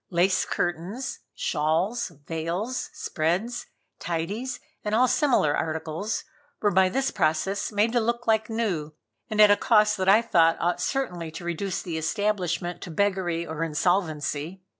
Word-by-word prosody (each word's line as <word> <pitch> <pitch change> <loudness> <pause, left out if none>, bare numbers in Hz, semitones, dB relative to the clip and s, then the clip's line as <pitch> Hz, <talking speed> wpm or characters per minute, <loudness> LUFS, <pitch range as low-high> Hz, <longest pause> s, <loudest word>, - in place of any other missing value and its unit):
Lace 185 +1 +2
curtains, 180 +10 -3 0.2
shawls, 165 +10 0 0.2
veils, 170 +10 -3
spreads, 185 +10 -2 0.3
tidies 200 +10 -3 0.2
and 210 0 0
all 250 +3 +5
similar 245 - +3
articles, 160 +6 -2 0.4
were 205 - +2
by 190 +1 +4
this 265 +7 0
process 190 +4 0
made 210 +2 +2
to 245 - +4
look 235 +1 -1
like 220 0 +2
new, 180 -10 -2 0.3
and 215 - -2
at 210 -1 +8
a - - +7
cost 210 -1 +3
that 190 0 +1
I 215 +4 +6
thought 165 -6 +4
ought 175 +1 0
certainly 180 -12 -2
to 160 +2 -8
reduce 175 +2 -2
the 165 -3 -3
establishment 180 -1 -1
to 180 - -7
beggary 175 -2 0
or 160 0 -3
insolvency. 160 0 -1
185 Hz, 145 wpm, -26 LUFS, 165-215 Hz, 0.4 s, at